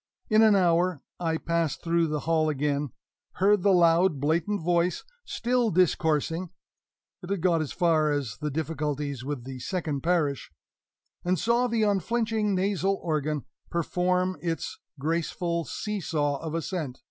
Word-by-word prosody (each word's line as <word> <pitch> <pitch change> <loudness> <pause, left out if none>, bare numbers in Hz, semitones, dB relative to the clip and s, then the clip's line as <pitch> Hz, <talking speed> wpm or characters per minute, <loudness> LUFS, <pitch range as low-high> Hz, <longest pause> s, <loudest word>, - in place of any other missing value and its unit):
In 215 +1 +6
an 215 -2 +6
hour 175 -3 +2 0.2
I 165 -2 0
passed 165 -2 -1
through 170 0 +2
the 150 -1 -2
hall 160 -1 +1
again, 145 0 -1 0.4
heard 200 +1 +3
the 200 - +4
loud, 170 -2 +4
blatant 165 +6 0
voice 175 +1 +1 0.2
still 245 -1 0
discoursing 165 -1 +1 0.7
(it 180 - -9
had 200 -3 -1
got 170 -2 +3
as 155 - -3
far 160 -3 +2
as 135 -8 -2
the 150 - -2
difficulties 145 -3 -3
with 140 -3 -4
the 130 0 -7
second 155 -3 -3
parish), 150 - 0 0.7
and 180 +1 +1
saw 235 +7 +2
the 230 -2 +1
unflinching 215 +1 +1
nasal 195 0 0
organ 155 -3 -1 0.2
perform 180 +2 0
its 165 -2 -3 0.2
graceful 170 +2 -1
seesaw 160 -9 -2
of 160 0 -5
assent. 165 -5 -3
170 Hz, 140 wpm, -27 LUFS, 150-185 Hz, 0.7 s, In